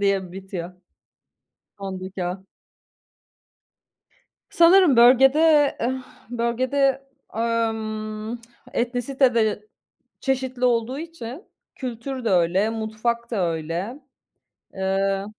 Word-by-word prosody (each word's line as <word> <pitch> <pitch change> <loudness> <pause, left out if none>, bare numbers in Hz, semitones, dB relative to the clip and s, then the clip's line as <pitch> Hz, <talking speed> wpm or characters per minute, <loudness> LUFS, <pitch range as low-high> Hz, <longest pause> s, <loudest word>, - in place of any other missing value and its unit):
diye 195 -3 0
bitiyor. 190 -2 -6 1.1
Sondaki 190 -1 -5
"a". 185 +2 -4 2.1
Sanırım 340 -5 +6
bölgede, 275 +5 +6
eh, 260 +2 -1 0.3
bölgede, 260 +3 0 0.3
emm, 220 -1 -2 0.3
etnisite 245 +1 +1
de 215 -2 0 0.5
çeşitli 260 -2 -1
olduğu 245 +2 +1
için 325 - -8 0.3
kültür 255 0 -5
de 225 - +1
öyle 185 +4 +2
mutfak 225 +2 -3
da 195 -6 0
öyle. 170 - -4 0.8
Eee 195 +1 0
230 Hz, 80 wpm, -23 LUFS, 195-260 Hz, 2.1 s, Sanırım